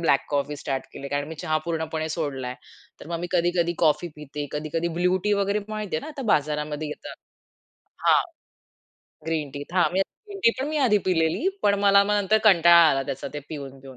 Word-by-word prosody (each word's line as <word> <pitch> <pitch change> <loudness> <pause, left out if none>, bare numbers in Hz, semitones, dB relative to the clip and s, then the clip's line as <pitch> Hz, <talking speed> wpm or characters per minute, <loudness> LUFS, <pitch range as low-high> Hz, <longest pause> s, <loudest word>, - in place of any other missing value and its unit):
Black 140 -5 +3
coffee 145 +1 -1
start 135 -2 -3
केली. 140 - -7
कारण 145 +1 -2
मी 160 - -6
चहा 155 0 +1
पूर्णपणे 160 -1 -2
सोडलाय. 140 -6 -3 0.5
तर - - -10
मग 170 0 -3
मी 175 - -3
कधी-कधी 175 -1 +2
कॉफी 155 +1 +2
पिते. 150 0 -6
कधी-कधी 155 +3 -2
ब्लू 180 +1 +3
टी 210 - +2
वगैरे 200 +1 +1
माहिती 215 -6 -3
आहे - - -2
ना - - -9
आता 290 -3 -7
बाजारामध्ये 150 +1 -1
येतात. 150 - -8 0.9
हां - - +6 1.0
ग्रीन 155 -3 -2
टीत, 145 +3 -8
हा 180 - +4
ग्रीन 395 - -4
टी - - +8
पण 275 - -1
मी 310 - -2
आधी 210 -3 +4
पिलेली. 165 - +1
पण 200 0 +4
मला 200 0 +6
मग 210 +1 +1
नंतर 205 +1 +3
कंटाळा 170 -4 +7
आला 135 -1 +1
त्याचा 135 0 -5
ते - - -2
पिऊन 140 -3 -7
पिऊन, 135 -1 -12
160 Hz, 195 wpm, -25 LUFS, 150-195 Hz, 1.0 s, टी